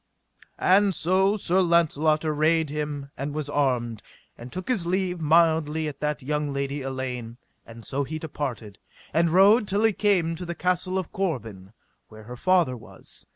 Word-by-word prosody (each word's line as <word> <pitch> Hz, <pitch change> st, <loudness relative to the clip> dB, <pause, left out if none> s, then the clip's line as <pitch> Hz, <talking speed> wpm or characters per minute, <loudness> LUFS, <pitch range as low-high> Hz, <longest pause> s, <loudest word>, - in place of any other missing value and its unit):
And 195 Hz, 0 st, +3 dB
so 190 Hz, +4 st, +2 dB
Sir 185 Hz, -1 st, +1 dB
Launcelot 160 Hz, -3 st, +2 dB
arrayed 155 Hz, 0 st, +1 dB
him 145 Hz, -2 st, -4 dB
and 145 Hz, +2 st, -5 dB
was 155 Hz, -2 st, -3 dB
armed, 125 Hz, -6 st, 0 dB, 0.3 s
and 120 Hz, +1 st, -11 dB
took 185 Hz, 0 st, -6 dB
his 205 Hz, -10 st, 0 dB
leave 180 Hz, -1 st, -1 dB
mildly 160 Hz, -1 st, +2 dB
at 145 Hz, -, -7 dB
that 150 Hz, -2 st, -2 dB
young 150 Hz, +1 st, -2 dB
lady 140 Hz, +1 st, -3 dB
Elaine; 125 Hz, -3 st, -5 dB, 0.3 s
and 115 Hz, 0 st, -12 dB
so 140 Hz, +1 st, -1 dB
he 155 Hz, +3 st, -5 dB
departed, 130 Hz, -, -6 dB, 0.3 s
and 165 Hz, +2 st, +3 dB
rode 200 Hz, +6 st, +5 dB
till 200 Hz, +3 st, 0 dB
he 220 Hz, -1 st, +4 dB
came 180 Hz, -6 st, +1 dB
to 180 Hz, -, -6 dB
the 170 Hz, -, -4 dB
Castle 180 Hz, +1 st, 0 dB
of 185 Hz, -3 st, -4 dB
Corbin, 115 Hz, -, -4 dB, 0.3 s
where 110 Hz, 0 st, -13 dB
her 120 Hz, +3 st, -9 dB
father 175 Hz, -2 st, +2 dB
was. 120 Hz, -, -14 dB
155 Hz, 165 wpm, -25 LUFS, 135-180 Hz, 0.3 s, rode